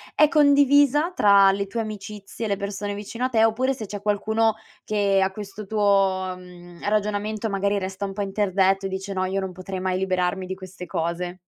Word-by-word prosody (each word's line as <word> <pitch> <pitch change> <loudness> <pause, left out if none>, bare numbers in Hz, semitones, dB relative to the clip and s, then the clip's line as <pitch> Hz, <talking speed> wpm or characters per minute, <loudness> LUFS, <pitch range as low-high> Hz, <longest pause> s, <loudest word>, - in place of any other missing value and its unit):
è 305 - +6
condivisa 285 +2 +4
tra 200 -1 +6
le 200 0 -2
tue 230 +3 -4
amicizie, 215 0 -6
le 200 -2 -1
persone 200 0 -4
vicino 210 +4 -6
a 255 - +1
te 225 -2 +4
oppure 255 +4 +1
se 220 -4 -7
c'è 200 0 -7
qualcuno 220 +2 +1 0.3
che 200 -2 +1
a 190 - 0
questo 205 0 -8
tuo, 195 -3 +1
mhmm, 175 -1 -14
ragionamento 210 +1 -1
magari 200 +1 0
resta 190 +1 -5
un 195 - -2
po' 205 - -4
interdetto 195 -1 +1
e - - -6
dice: 190 +1 -5
"No, 185 0 -1
io 190 +1 -1
non 190 -1 -4
potrei 185 +1 -6
mai 185 0 -1
liberarmi 185 0 -1
di 190 +1 -5
queste 185 -1 -10
cose." 175 +1 -3
200 Hz, 195 wpm, -24 LUFS, 190-215 Hz, 0.3 s, è